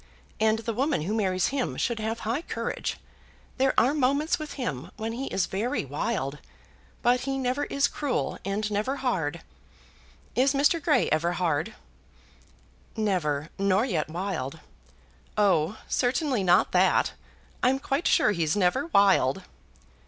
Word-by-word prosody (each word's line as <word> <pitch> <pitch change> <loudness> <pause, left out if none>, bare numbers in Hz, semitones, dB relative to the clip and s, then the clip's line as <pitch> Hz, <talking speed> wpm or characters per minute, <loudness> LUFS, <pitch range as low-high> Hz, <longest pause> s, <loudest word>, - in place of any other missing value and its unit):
And 220 0 +3
the 230 +1 -3
woman 265 - 0
who 195 +6 -2
marries 190 -4 +1
him 270 -2 -2
should 235 -3 -1
have 220 +1 -3
high 235 +7 -1
courage. - - -3 0.6
There 265 0 +3
are 255 +5 +3
moments 295 +4 +1
with 310 -1 -6
him 150 - -4
when 220 +1 -3
he 265 +3 -4
is 185 - 0
very 210 - -2
wild; 150 - -2 0.6
but 245 +1 +4
he 270 +1 -2
never 260 +2 -1
is 280 0 +1
cruel 285 -4 -2
and 210 +2 -2
never 215 +7 0
hard. 195 - -2 0.9
Is 265 +4 +3
Mr. 295 +4 +3
Grey - - +3
ever 170 +3 +1
hard?" 170 +2 -1 1.2
"Never; 165 -8 0
nor 195 +3 +3
yet 165 - -1
wild." 165 -4 -4 0.8
"Oh, 190 -2 +2
certainly 250 -2 0
not 180 0 +4
that. - - +3 0.5
I'm 260 +2 +3
quite 275 +4 -1
sure 305 -10 +4
he's 165 -5 0
never 205 - +1
wild." 195 - +3
220 Hz, 140 wpm, -27 LUFS, 180-265 Hz, 1.2 s, but